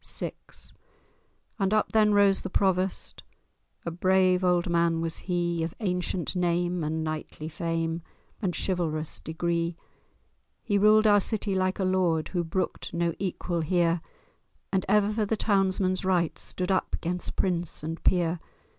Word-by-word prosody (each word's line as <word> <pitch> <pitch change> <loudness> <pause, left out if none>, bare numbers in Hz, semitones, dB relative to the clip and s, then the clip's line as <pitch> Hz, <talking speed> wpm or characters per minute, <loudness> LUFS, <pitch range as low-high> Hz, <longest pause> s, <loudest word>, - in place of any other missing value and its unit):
VI - - -4 1.3
And 195 +1 +2
up 215 - +1
then 215 -1 +4
rose 200 -1 +4
the 190 - -5
Provost— 190 -1 0 0.6
A 170 - -2
brave 185 +1 +3
old 180 0 +2
man 170 -1 +2
was 165 0 -2
he, 175 -1 0
Of 160 0 -3
ancient 180 -3 -2
name, 175 -1 0
and 160 +1 -1
knightly 155 0 -5
fame, 165 0 -2 0.4
And 180 -5 -1
chivalrous 160 -4 -1
degree. 170 +1 -2 0.9
He 205 -3 +1
ruled 215 +1 +6
our 205 -1 +6
city 210 -1 -1
like 185 0 +1
a 195 - -1
Lord 180 -4 +1
Who 175 -2 -1
brooked 170 +1 -3
no 170 0 +1
equal 175 -2 -2
here, 170 0 +2 0.7
And 190 -1 0
ever 210 +1 +3
for 215 -1 0
the 220 - 0
townsmen's 190 -2 +1
rights 180 -3 +1
Stood 185 +1 -2
up 185 - +1
'gainst 175 +1 -3
prince 175 -4 -1
and 165 +2 -5
peer. 175 -1 +2
180 Hz, 145 wpm, -27 LUFS, 170-190 Hz, 1.3 s, ruled